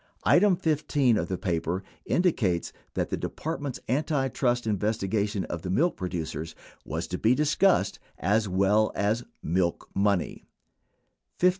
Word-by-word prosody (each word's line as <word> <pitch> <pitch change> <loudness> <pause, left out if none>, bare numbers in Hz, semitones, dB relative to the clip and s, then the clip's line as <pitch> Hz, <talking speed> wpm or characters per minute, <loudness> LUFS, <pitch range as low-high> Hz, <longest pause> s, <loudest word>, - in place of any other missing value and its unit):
22 - - +5
Item 195 +1 +5
15 145 -6 +2
of - - -1
the 95 - -2
paper 85 0 -1 0.2
indicates 110 - +1 0.2
that - - -1
the - - -1
Department's 145 -4 -4
antitrust 135 -3 0
investi 105 -1 -1
gation 105 -1 0
of 85 - -5
the 90 - -5
milk 165 - +2
producers 80 -3 -4 0.3
was - - -3
to - - -4
be 115 +3 +4
discussed, 150 - +2 0.2
as 105 +3 +1
well 100 +4 +3
as 105 +4 +1 0.2
"milk 85 +1 0
money": 100 -2 0 0.9
15. 180 - +5
110 Hz, 140 wpm, -27 LUFS, 95-140 Hz, 0.9 s, 22